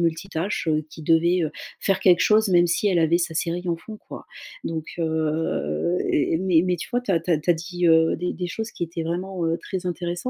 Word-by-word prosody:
multitâche, 170 +2 -2
heu, 155 -1 +1
qui 160 - -10
devait, 170 +3 +3
heu, 155 - -2 0.3
faire 195 -1 0
quelque 180 -2 +5
chose 215 +1 +4
même 175 -1 +5
si 175 +4 +1
elle 180 -3 +2
avait 165 +1 +3
sa 170 -2 -2
série 175 +2 -2
en 170 - 0
fond 215 +6 -10
quoi. - - -9 0.4
Donc, 160 -1 -3
heu 160 - -1
et 150 - +2
mais 175 -3 +3
mais 180 -1 +1
tu 170 - -7
vois 245 0 +1
tu 230 -6 -2
as 165 - +2
tu 175 - -5
as 165 - +4
tu 155 +4 0
as - - +8
dit, 175 +1 -2
heu, 160 0 +4
des 180 +1 -2
des 180 - -4
choses 220 +5 -5
qui - - -6
étaient 165 0 -3
vraiment, 175 +1 -3
heu, 165 - +1
très 185 -1 -5
intéressantes. 175 0 -3
170 Hz, 240 wpm, -24 LUFS, 160-180 Hz, 0.4 s, as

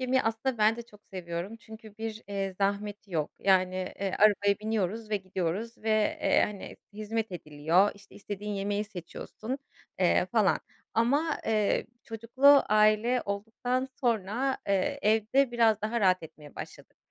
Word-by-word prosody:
yemeyi 260 0 +2
aslında 225 +2 -1
ben 215 +2 +4
de 235 - -6
çok 210 -3 -19
seviyorum 180 +3 -5
çünkü 220 -2 -13
bir, 225 0 -5
eee, 195 -1 -3
zahmeti 205 0 -2
yok. 155 -3 -1
Yani, 185 -1 +3 0.3
eee, 195 -1 -1
arabaya 205 -1 +4
biniyoruz 215 0 -2
ve 210 - +2
gidiyoruz 190 +4 -3
ve, 220 - -5 0.3
eee, - - +3
hani, 205 -2 -8 0.2
hizmet 215 0 -3
ediliyor, 160 +4 +2
işte, 200 0 -18
istediğin 205 0 -6
yemeği 205 +1 -1
seçiyorsun, 215 - -7 0.4
eee, - - +3
falan - - +2 0.3
ama, 280 +8 +2
eee, 215 -2 +1 0.2
çocuklu 255 +6 +4
aile 215 +4 +3
olduktan 230 +6 -2
sonra, 240 +2 0
eee, 200 +9 +1
evde 225 +5 +3
biraz 225 -3 +3
daha 230 +2 -1
rahat 185 -3 +3
etmeye 150 -2 -12
başladık. - - -10
215 Hz, 145 wpm, -29 LUFS, 195-230 Hz, 0.4 s, ben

